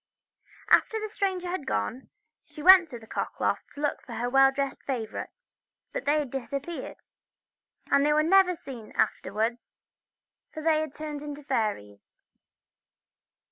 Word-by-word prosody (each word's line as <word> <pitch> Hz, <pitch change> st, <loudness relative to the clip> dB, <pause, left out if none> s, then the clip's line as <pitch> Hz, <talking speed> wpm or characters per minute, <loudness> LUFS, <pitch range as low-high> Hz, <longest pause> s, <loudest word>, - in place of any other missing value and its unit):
After 445 Hz, -, +4 dB
the 435 Hz, -, -3 dB
stranger 380 Hz, -4 st, -2 dB
had 350 Hz, -5 st, -4 dB
gone 105 Hz, -, -2 dB, 0.3 s
she 300 Hz, -, -11 dB
went 365 Hz, -2 st, +8 dB
to 245 Hz, -, -7 dB
the 225 Hz, -, -14 dB
cock -, -, -4 dB
loft -, -, -1 dB
to 290 Hz, -, -7 dB
look 290 Hz, -, -1 dB
for 240 Hz, -, -10 dB
her 240 Hz, +2 st, -2 dB
well 270 Hz, 0 st, +6 dB
dressed 275 Hz, 0 st, -3 dB
favourites, 260 Hz, -, -6 dB, 0.3 s
but -, -, -4 dB
they 295 Hz, +1 st, +3 dB
had 290 Hz, -5 st, -2 dB
disappeared, 280 Hz, +5 st, -5 dB, 0.9 s
and 280 Hz, 0 st, +5 dB
they 300 Hz, -, +3 dB
were 305 Hz, +1 st, +4 dB
never 365 Hz, +2 st, +5 dB
seen 250 Hz, -8 st, -10 dB
afterwards, 225 Hz, +3 st, -1 dB, 0.7 s
for 310 Hz, -, -7 dB
they 315 Hz, -1 st, +3 dB
were 310 Hz, 0 st, -2 dB
turned 295 Hz, 0 st, -6 dB
into 295 Hz, 0 st, -7 dB
fairies. 155 Hz, -, -3 dB
290 Hz, 150 wpm, -27 LUFS, 245-330 Hz, 0.9 s, went